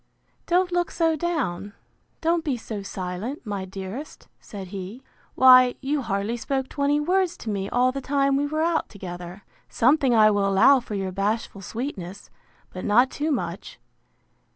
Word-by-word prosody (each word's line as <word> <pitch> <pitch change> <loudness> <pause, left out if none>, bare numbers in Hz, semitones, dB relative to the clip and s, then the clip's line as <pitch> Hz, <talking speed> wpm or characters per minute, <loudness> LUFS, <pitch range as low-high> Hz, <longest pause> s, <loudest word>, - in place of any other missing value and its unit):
—Don't 360 +1 +2
look 350 -1 0
so 330 -1 +1
down, 265 - -2 0.5
don't 330 0 +1
be 285 -6 -1
so 220 -2 -6
silent, 195 - -5
my 200 -3 -4
dearest, 195 +9 -8
said 195 -3 -9
he; 200 +6 -7 0.3
why, 255 -1 +7
you 280 +2 -1
hardly 205 0 -2
spoke 265 +2 -2
twenty 285 +1 +1
words 360 +3 +1
to 220 - -5
me 195 -1 -3
all 250 +1 +2
the 275 +1 -5
time 275 0 +1
we 285 +1 +1
were 310 +2 -1
out 335 -1 0
together. 180 0 -8 0.3
Something 260 0 +3
I 215 -1 +6
will 200 -1 +1
allow 195 +8 +5
for 225 -3 -7
your 195 -1 -3
bashful 200 +1 -2
sweetness; 200 -4 -6 0.4
but 185 - -6
not 245 +5 +4
too 305 +2 -2
much. 195 - -4
245 Hz, 160 wpm, -24 LUFS, 195-290 Hz, 0.5 s, why